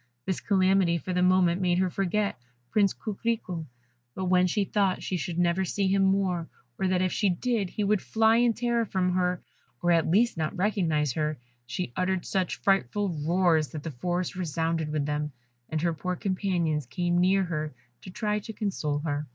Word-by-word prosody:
This 190 - -1
calamity 190 -3 +3
for 185 +3 -4
the 180 - +1
moment 180 -1 +3
made 175 -1 +2
her 185 -1 +1
forget 200 +2 0 0.4
Prince 200 -3 +3
Coquerico; 210 -6 -3 0.5
but 190 - -3
when 180 0 +4
she 205 +3 +1
thought 195 -2 0
she 185 - -2
should 170 0 -3
never 175 +1 +2
see 195 +2 0
him 195 0 +3
more, 190 -4 +1 0.3
or 190 - +1
that 185 0 +2
if 185 - 0
she 205 - +2
did, 205 +1 0
he 210 - -3
would 200 -1 +2
fly 225 0 +3
in 240 -1 +4
terror 235 0 0
from 185 -4 0
her, 180 -1 0 0.4
or 175 - +2
at 165 -2 +3
least 220 +4 +3
not 160 +3 -2
recognise 170 - +1
her, 155 0 -1 0.3
she 125 +1 -4
uttered 185 0 0
such 190 -2 -1
frightful 195 +1 +1
roars 165 0 +2
that 150 0 -7
the 165 - -4
forest 175 +8 -2
resounded 165 -2 -1
with 150 -2 -1
them, 150 0 -2 0.4
and 155 0 -2
her 170 -1 +2
poor 180 +3 -3
companions 175 - -1
came 175 +3 0
near 190 +2 +3
her 155 -4 -3 0.3
to - - -10
try 210 +2 -1
to 220 +2 -8
console 185 -9 -2
her. 145 -1 -2
180 Hz, 190 wpm, -27 LUFS, 165-195 Hz, 0.5 s, when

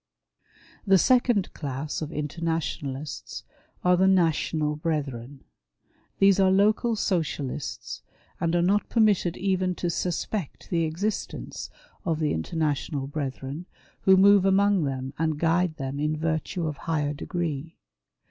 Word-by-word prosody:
The 195 0 +7
second 240 -1 +3
class 145 +1 -4
of 155 0 -4
Internationalists 150 -2 -4 0.4
are 180 0 +5
the 190 +2 +4
National 160 -4 +2
Brethren. 140 -4 -3 0.7
These 195 0 +5
are 190 -1 +5
local 215 +4 +3
socialists, 160 -9 -2 0.4
and 170 0 0
are 170 - +3
not 200 +3 +2
permitted 205 -6 +2
even 185 -1 0
to 175 0 -1
suspect 180 0 -3
the 165 -2 +2
existence 185 +7 -4 0.3
of 165 -5 0
the 155 -1 0
International 145 - -1
Brethren, 140 +3 -5 0.3
who 190 0 +6
move 200 0 +6
among 195 -2 +3
them 135 0 -3
and 160 -2 0
guide 165 +1 +1
them 135 0 -4
in 150 +1 0
virtue 160 +2 -2
of 155 -2 -3
higher 150 -3 -1
degree. 165 -1 -4
165 Hz, 125 wpm, -26 LUFS, 150-190 Hz, 0.7 s, The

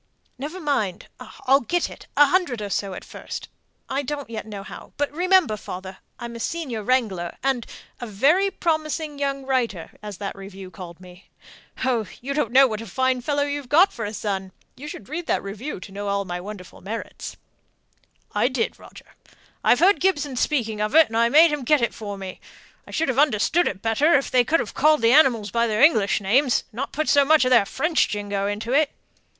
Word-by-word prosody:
"Never 305 +7 -5
mind; 220 - -2 0.4
I'll 270 +1 +5
get 345 +7 -1
it - - -13
a 290 - +8
hundred 290 - +1
or 205 -1 -5
so 195 -2 -2
at - - -9
first - - -8 0.4
I 270 +1 -1
don't 285 -2 -5
yet 220 -1 -5
know 205 -2 -7
how - - -11
but 290 -1 -1
remember, 360 - +3
father, 190 -1 -8 0.2
I'm 235 0 -7
a - - -7
senior 270 -5 -3
wrangler, 210 -8 -1
and 265 -4 0 0.3
a 240 - -6
'very 290 - +3
promising 310 -4 -2
young 275 -1 -2
writer,' 235 -10 -1
as 210 -3 -7
that 200 0 -5
review 195 -1 -10
called 175 -3 -10
me. 180 0 -15 0.6
Oh, 235 -5 0
you 275 +3 -4
don't 275 -6 -1
know 270 +2 +7
what 220 -4 -3
a 230 - -8
fine 260 -1 0
fellow 285 +3 0
you've 285 -2 -4
got 345 +6 +5
for 230 - -5
a 205 - -3
son! 195 -3 -3 0.2
You 285 +3 -9
should 290 - -8
have - - -20
read 345 +3 -5
that - - 0
review 205 +6 -6
to 195 - -10
know 200 +1 -5
all 200 0 -1
my 175 -1 -5
wonderful 185 -3 -10
merits." 220 +5 -7 1.0
"I - - +2
did, 255 -3 -2
Roger. - - -15 0.5
I - - +5
heard 350 +4 +4
Gibson 295 -8 +1
speaking 230 -6 0
of 215 +7 -1
it, 320 -5 +7
and 225 - -2
I 235 0 +4
made 315 +5 +6
him 290 -3 -3
get 300 +4 +4
it 235 - 0
for 205 -2 -6
me. 190 -1 -8 0.5
I - - -14
should 320 -2 -1
have 260 +1 0
understood 295 +5 +3
it 195 -1 -4
better 275 +9 +3
if 275 - 0
they 250 -1 +4
could 325 +7 +2
have - - -6
called 305 -2 +3
the 230 - +5
animals 240 -9 +4
by 235 +2 +1
their 215 +2 +1
English 215 -12 +4
names, 245 +7 +2
and 220 - -16
not 275 +2 -3
put 310 +1 -2
so 285 -1 +5
much 305 -1 +4
of 255 - +1
their 235 -5 +6
French 320 0 +1
jingo 205 -1 -2
into 215 +4 -3
it." 295 +1 +4
245 Hz, 210 wpm, -23 LUFS, 205-290 Hz, 1.0 s, a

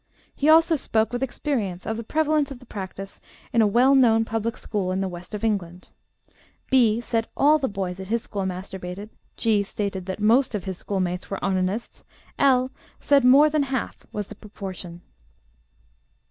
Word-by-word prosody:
He 290 - +1
also 325 +1 +6
spoke 225 -5 0
with 245 - -2
experience 235 - -2
of 220 - -2
the 230 - -5
prevalence 305 +2 +1
of 275 - -7
the 250 - -16
practice 195 -2 -7 0.3
in 230 - +4
a 215 - +5
well 245 +6 +4
known 225 -4 +5
public 225 +1 -2
school 195 -4 -2
in 185 - -1
the 195 - -1
west 180 +3 -8
of 210 - -6
England. 185 -5 -2 0.8
B. 235 -4 +4
said 225 -1 -1
all 300 +2 +5
the 270 - 0
boys 190 -3 -4
at 190 - -7
his 230 +2 -1
school 200 - -4
masturbated; 190 +2 -5 0.3
G. 220 -3 +2
stated 200 -2 -4
that 190 +2 -4
most 230 +3 +3
of 200 - -3
his 190 -1 -5
schoolmates 185 -2 -2
were 195 - -3
onanists; 190 +3 -2 0.4
L. 260 -2 +3 0.3
said 280 -2 +3
'more 270 +4 +7
than 305 -1 +2
half' 265 -3 -3
was 210 -1 -3
the 215 - -10
proportion. 190 -5 -9
215 Hz, 175 wpm, -24 LUFS, 190-255 Hz, 0.8 s, more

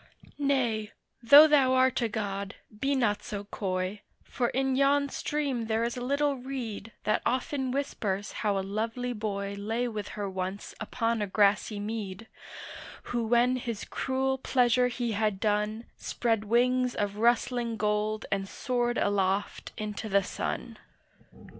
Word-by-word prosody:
Nay, 245 -7 0 0.3
though 285 +6 +10
thou 270 -4 +4
art 260 0 +3
a 230 - +1
god, 200 -1 -3 0.2
be 275 +6 0
not 215 -6 +1
so 205 -1 -5
coy, 190 0 -3 0.2
For 240 -3 -1
in 265 0 0
yon 280 +1 +3
stream 275 -8 -2
there 220 +1 +1
is 235 0 -1
a 245 - -5
little 280 +2 +1
reed 245 -5 -5
That 215 - +1
often 260 +1 -1
whispers 210 -7 -2
how 205 -2 0
a 190 - -2
lovely 225 +5 -2
boy 200 -2 -3
Lay 225 +4 -1
with 210 -3 -4
her 205 -1 -2
once 190 +1 -4
upon 225 +1 -1
a 205 - 0
grassy 205 +1 +2
mead, 210 -1 -5 0.9
Who 240 -1 +1
when 240 +2 +3
his 235 -4 -4
cruel 265 0 -1
pleasure 250 -1 +3
he 240 -1 -2
had 210 -2 0
done 210 +2 0
Spread 225 -3 -1
wings 250 +3 +2
of 205 0 -2
rustling 235 0 +1
gold 210 +1 0
and 195 -1 -1
soared 240 -2 -1
aloft 200 0 0
into 215 0 -4
the 200 0 +3
sun. - - -4
225 Hz, 145 wpm, -29 LUFS, 205-250 Hz, 0.9 s, though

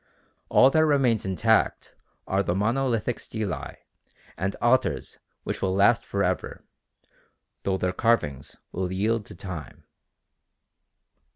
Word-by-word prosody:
All 130 - +6
that 155 +2 +4
remains 135 -9 +2
intact 110 +4 +1 0.3
are 95 +1 +1
the 90 -2 -1
monolithic 115 +2 0
stelae 110 -4 -5 0.6
and 95 +4 -2
altars 130 +2 +1 0.2
which - - -4
will 95 -1 0
last 100 +3 +4
for 100 0 0
ever, 90 0 -2 1.0
though 95 -1 0
their 90 0 -1
carvings 75 - 0
will 90 0 -3
yield 105 +3 0
to - - -11
time. 90 -6 -8
100 Hz, 115 wpm, -26 LUFS, 95-120 Hz, 1.0 s, All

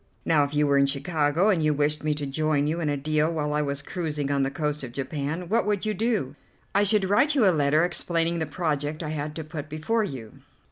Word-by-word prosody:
Now, 155 -3 +4
if 145 +1 -3
you 150 0 +3
were 140 -1 +3
in 140 - +4
Chicago, 145 +5 +1
and 185 -6 +2
you 155 -1 +2
wished 150 +1 0
me 155 -1 +1
to 145 -1 -4
join 145 +1 0
you 160 +3 -1
in 155 -3 -1
a 145 - 0
deal 155 +3 +1
while 150 -2 -2
I 150 - +1
was 140 0 -3
cruising 150 -5 -3
on 140 -1 +1
the 135 - +1
coast 150 0 -2
of 120 -2 -7
Japan, 145 +6 -3
what 230 +5 +2
would 205 -1 0
you 215 - 0
do?" 210 - -1 0.4
"I 200 - +4
should 205 -1 +2
write 280 +10 +3
you 255 -7 +4
a 190 - +6
letter 150 +2 +3
explaining 170 -1 -1
the 160 - -2
project 155 -1 -2
I 155 - -4
had 150 0 -4
to 160 - -4
put 155 -1 -7
before 185 +10 0
you." 130 - -7
155 Hz, 245 wpm, -26 LUFS, 145-170 Hz, 0.4 s, a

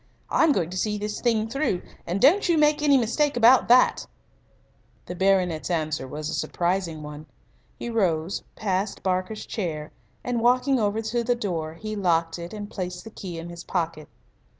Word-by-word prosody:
I'm 320 - +4
going 175 - 0
to 185 - -4
see 210 +2 0
this 210 0 -4
thing 225 -3 +1
through, 230 -7 -1 0.2
and 180 +3 -1
don't 350 - +5
you 335 - +4
make 300 0 +3
any 285 -2 +5
mistake 260 +4 +1
about 240 +2 +6
that." 250 +1 +4 1.0
The - - -6
baronet's 180 -3 +1
answer 155 -5 -1
was 150 +3 -5
a - - -3
surprising 175 -3 -1
one. 150 +1 -9 0.5
He - - -6
rose, 185 -6 0
passed 195 0 -2
Barker's 185 +3 -1
chair, 160 -8 -4 0.3
and, 245 -2 -1
walking 255 +2 +3
over 215 +1 0
to 235 +2 -1
the 245 +1 +1
door, 165 -8 -3
he 215 +5 -5
locked 170 -4 +1
it 170 0 -7
and 210 -1 -6
placed 180 -3 -5
the 225 - -10
key 180 -5 -7
in 165 +1 -7
his 170 0 -9
pocket. 165 -4 -3
195 Hz, 175 wpm, -25 LUFS, 170-235 Hz, 1.0 s, about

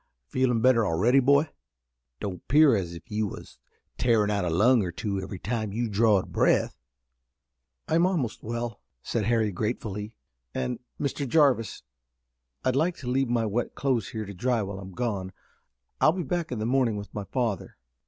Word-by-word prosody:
Feelin' 125 - +1
better 125 -2 +5
already, 105 +9 +3
boy? 140 +4 +3 0.7
Don't 95 -3 -6
'pear 145 -2 +6
as 85 -4 -3
if 85 - -13
you 105 0 0
was - - -10 0.4
tearin' 110 -4 +3
out 100 -2 0
a 90 - 0
lung 110 +9 +4
or 90 -3 -2
two 100 +2 -3
every 95 0 -6
time 110 +1 -3
you 115 +3 -1
drawed 105 -2 +2
breath?" - - +2 1.1
"I'm 165 +3 +3
almost 155 - -2
well," 115 -1 -4 0.2
said 110 -3 -1
Harry 110 -2 +2
gratefully, 105 +1 -3 0.4
"and, 125 -2 -2 0.2
Mr. 140 0 -2
Jarvis, 135 -6 +2 0.8
I'd 130 0 +2
like 165 +5 +2
to 125 - -9
leave 135 -1 +1
my 120 -2 +1
wet 110 +3 -2
clothes 130 -6 0
here 110 -3 -4
to 100 - -8
dry 120 +3 0
while 100 0 -5
I'm 95 -1 -9
gone. 100 -5 -3 0.7
I'll 155 - +5
be 180 -1 -3
back 170 +1 -2
in 125 - -2
the 110 - -2
morning 125 -3 +2
with 100 -1 -8
my 105 -1 -4
father." 115 -6 -2
115 Hz, 175 wpm, -27 LUFS, 100-130 Hz, 1.1 s, pear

